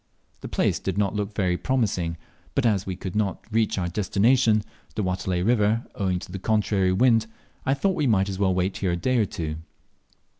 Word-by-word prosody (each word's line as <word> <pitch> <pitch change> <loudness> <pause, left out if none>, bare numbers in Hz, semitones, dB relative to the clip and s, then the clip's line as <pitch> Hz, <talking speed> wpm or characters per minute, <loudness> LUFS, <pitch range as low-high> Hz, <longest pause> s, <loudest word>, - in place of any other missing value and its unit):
The - - -7
place - - 0
did - - -3
not 100 -2 +1
look 105 0 -3
very 90 -3 +1
promising, 95 -11 0 0.4
but 135 - +1
as 100 -5 +2
we 95 - -2
could 95 +1 -6
not 105 -3 -1
reach 110 -1 +1
our 90 -2 0
destination, 105 +4 +2 0.3
the 105 - -1
Watelai 90 -1 -1
river, 110 0 +2
owing 95 -3 0
to 90 - -8
the 95 - -5
contrary 100 -2 +1
wind, 115 +2 +3 0.4
I 135 - +3
thought 190 +8 +1
we 150 -5 0
might 100 -4 +3
as 95 -1 -4
well 95 -2 +3
wait 95 +1 0
here 95 -3 0
a - - -1
day 130 +7 +1
or 110 - +3
two. 80 -3 -4
100 Hz, 200 wpm, -25 LUFS, 95-110 Hz, 0.4 s, wind